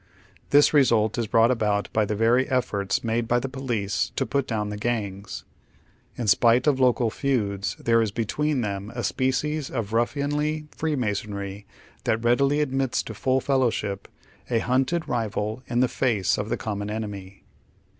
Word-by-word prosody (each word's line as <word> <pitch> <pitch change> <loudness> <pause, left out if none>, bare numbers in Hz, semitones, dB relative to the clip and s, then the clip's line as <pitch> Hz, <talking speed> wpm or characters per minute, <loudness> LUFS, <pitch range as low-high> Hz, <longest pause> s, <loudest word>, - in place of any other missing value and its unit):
This 145 +2 +5
result 115 -6 +3
is 115 - -1
brought 115 +3 +4
about 105 -4 0
by 110 -1 +2
the 105 - -2
very 120 +6 +3
efforts 100 -7 0
made 115 0 -1
by 120 - +2
the 130 - -3
police 120 -7 -2
to - - 0
put 140 -2 -1
down 105 -2 -2
the 105 - -4
gangs. 105 -4 -3 0.7
In 120 - -3
spite 115 +5 +4
of 145 -3 +3
local 125 -3 +3
feuds, 105 -8 -1
there 115 0 +2
is 110 - +1
between 130 +6 -1
them 100 -1 -4
a 120 - -3
species 135 +3 -1
of 110 -4 -4
ruffianly 145 +5 0
Freemasonry 105 -8 -3 0.4
that 110 +1 0
readily 140 +5 +3
admits 135 -3 0
to 110 - -7
full 130 +4 +1
fellow 130 -3 +2
ship 100 -3 -4 0.4
a 120 - +2
hunted 130 +8 0
rival 110 -2 -2
in 120 0 +1
the 130 - +4
face 115 -8 0
of 105 - -3
the - - -1
common 105 -2 -4
enemy. 100 -3 -6
115 Hz, 165 wpm, -25 LUFS, 105-130 Hz, 0.7 s, This